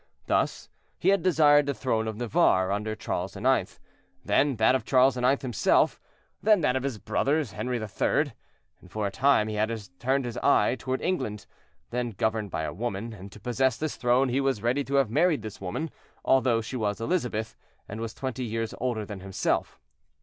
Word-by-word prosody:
Thus - - 0 0.3
he - - +2
had 195 -2 +3
desired 145 -5 +5
the 140 - -1
throne 110 -4 -1
of 110 -1 -4
Navarre 100 -5 +2
under 105 +2 -2
Charles - - -4
IX., - - 0 0.5
then 140 -1 +2
that 110 +3 +4
of 130 -3 0
Charles 130 +1 +4
IX. 125 +2 +2
himself, 120 -5 +2 0.4
then 210 -3 +4
that 125 -4 +2
of 130 - 0
his 135 -4 -3
brother 145 +8 0
Henri 120 +1 -3
III. 110 -3 0 0.6
For 105 +2 -3
a 100 - -1
time 130 -1 +3
he 110 - -4
had 110 +2 -1 0.2
turned 135 +2 +1
his 120 0 -5
eyes 130 - +3
toward 130 +2 -2
England, 110 - -2 0.5
then 120 -1 -2
governed 110 -2 0
by 80 - -3
a - - -3
woman, 110 +2 -4
and 100 -1 -10
to 105 - -13
possess 125 +2 0
this 155 +1 -3
throne 125 +2 +2
he 130 +3 +1
was 135 -6 0
ready 125 +4 +1
to 140 - -2
have 135 -6 +3
married 160 +3 +2
this 110 -3 -8
woman, 125 - -4 0.3
although 130 -3 +3
she 110 +4 -6
was 105 -3 -1
Elizabeth, 115 -6 -2 0.3
and 110 +2 -6
was 115 0 -5
twenty 130 -1 -4
years 115 -1 -3
older 120 -4 -1
than 100 -2 -7
himself. 95 0 -2
120 Hz, 185 wpm, -27 LUFS, 110-135 Hz, 0.6 s, desired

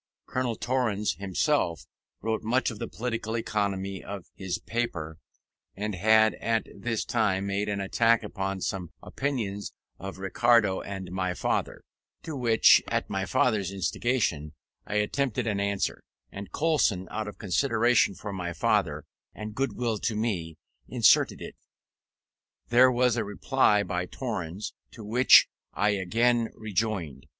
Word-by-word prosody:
Colonel 125 -2 -2
Torrens 110 -4 0
himself 100 - 0 0.4
wrote 110 0 -1
much 125 +3 +1
of 110 - -9
the - - -3
political 115 -1 -3
economy 100 -4 -2
of 100 -3 -7
his 95 -2 -3
paper; 80 -10 -4 0.6
and 105 +2 -3
had 110 +3 +4
at 115 -1 0
this 115 -2 -2
time 100 -4 +1
made 100 +1 -1
an 100 -1 -2
attack 115 +4 +2
upon 95 -1 -4
some 90 -3 -3
opinion 115 -8 -3 0.4
of 95 0 -7
Ricardo 105 +1 +2
and 95 -3 -7
my 90 -1 -2
father, - - -2 0.4
to 160 - -5
which, 115 -4 +5
at - - -2
my - - -1
father's 105 -7 +1
instigation, 95 - -1 0.3
I 105 - -4
attempted 125 +3 0
an 105 -3 -1
answer, 100 -1 -1 0.3
and 100 -1 -8
Coulson, 130 - +1
out 110 -1 -3
of 105 - -8
consideration 115 +1 +2
for 105 +1 -7
my 90 -2 -4
father 80 - 0 0.3
and 105 +1 -6
goodwill 120 -3 -1
to 115 - -1
me, 90 -8 -2 0.3
inserted 115 -6 +3
it. - - -9 1.1
There 125 +2 +6
was 125 -1 +2
a 115 - +1
reply 105 0 +2
by 90 -2 -3
Torrens, 100 -6 -5 0.2
to 110 - -10
which 120 +5 +6 0.3
I 105 - +2
again 115 +5 +1
rejoined. 100 -10 -3
105 Hz, 140 wpm, -27 LUFS, 95-120 Hz, 1.1 s, There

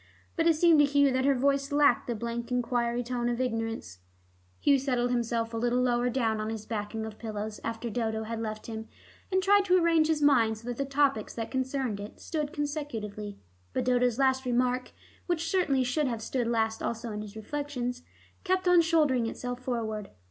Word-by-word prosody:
But 330 -1 +2
it 330 - +5
seemed 325 -1 +5
to 295 - +7
Hugh 285 -1 +3
that 260 +1 +1
her 280 -1 +4
voice 275 +2 +1
lacked 285 -4 +3
the 240 - -1
blank 235 +2 -4
enquiry 245 -1 0
tone 240 0 -1
of 240 0 -2
ignorance. 225 - -3 0.6
Hugh 280 -2 +4
settled 250 -2 0
himself 230 -1 -1
a - - -2
little 240 +2 +1
lower 245 -1 +2
down 225 -3 0
on 215 - -3
his 220 -1 -5
backing 220 0 -4
of 220 -1 -9
pillows, 215 -1 -5
after 230 +1 -3
Dodo 220 -1 -2
had 225 +1 -4
left 215 -1 -5
him, 220 -1 -6 0.4
and 375 0 +2
tried 405 +1 +5
to 365 -1 +4
arrange 330 -3 +4
his 310 -2 +1
mind, 230 -6 +4
so 230 +3 -8
that 240 - -4
the 275 - -1
topics 275 -5 +1
that 225 -1 -4
concerned 260 -4 -1
it 205 +1 -9
stood 300 -2 -3
consecutively. 235 - -4 0.4
But - - -1
Dodo's 250 -2 +2
last 265 -1 +2
remark, 250 0 0 0.4
which 335 -2 0
certainly 290 -9 +2
should 270 +4 0
have 230 -3 -3
stood 245 0 -1
last 225 -1 0
also 230 0 -3
in 210 0 -4
his 210 0 -9
reflections, 250 +1 -4 0.4
kept 370 -1 +1
on 355 -1 +7
shouldering 300 -8 +2
itself 245 +2 -5
forward. 220 -5 -3
245 Hz, 195 wpm, -29 LUFS, 225-280 Hz, 0.6 s, to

